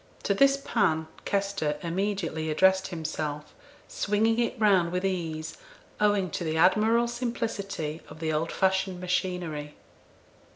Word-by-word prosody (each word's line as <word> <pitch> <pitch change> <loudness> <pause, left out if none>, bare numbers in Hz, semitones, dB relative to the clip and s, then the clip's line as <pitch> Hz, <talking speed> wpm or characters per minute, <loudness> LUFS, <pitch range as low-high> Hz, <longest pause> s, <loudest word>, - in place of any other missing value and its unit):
To 200 - +2
this 275 +6 +4
pan 160 -11 +1 0.2
Kester 195 -7 -1
immediately 170 -3 -2
addressed 190 +4 +3
himself, 155 -3 -4 0.3
swinging 220 +3 +1
it 240 0 -1
round 190 -6 +4
with 180 +1 -1
ease, 165 - -3 0.4
owing 205 -4 +2
to 175 - -3
the 160 -1 -1
admirable 220 +7 +4
simplicity 205 -9 -3
of - - -11
the 160 -1 -1
old 160 +2 -1
fashioned 190 -1 +1
machinery. 180 -5 -2
185 Hz, 125 wpm, -27 LUFS, 160-205 Hz, 0.4 s, this